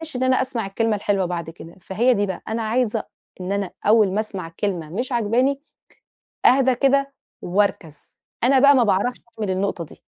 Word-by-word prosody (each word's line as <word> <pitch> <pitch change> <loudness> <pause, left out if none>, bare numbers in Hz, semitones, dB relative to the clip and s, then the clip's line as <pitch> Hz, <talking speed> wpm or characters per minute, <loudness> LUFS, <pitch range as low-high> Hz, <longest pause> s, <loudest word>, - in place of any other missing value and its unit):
إن 250 - -1
أنا 260 0 +3
أسمع 255 -4 -3
الكلمة 220 +2 0
الحلوة 200 -2 0
بعد 170 -2 -4
كده، 165 0 -12
فهي 235 +8 +2
دي 205 -3 0
بقى 190 -2 -5
أنا 225 +1 -2
عايزة 225 0 0 0.4
إن 180 +1 -4
أنا 200 -2 -2
أول 210 -2 +4
ما 205 - 0
أسمع 195 -6 -4
كلمة 175 -7 -2
مش 245 - -4
عاجباني 245 +4 +1 0.9
أَهْدَى 260 0 +5
كده، 275 +2 +2 0.3
وأَركَزْ. 175 -5 -2 0.3
أنا 265 +2 +5
بقى 280 +2 +7
ما 250 -3 +4
باعرفش 210 +4 0 0.2
أعمل 210 -3 -2
النقطة 185 -2 -2
دي. - - -16
215 Hz, 175 wpm, -22 LUFS, 190-250 Hz, 0.9 s, بقى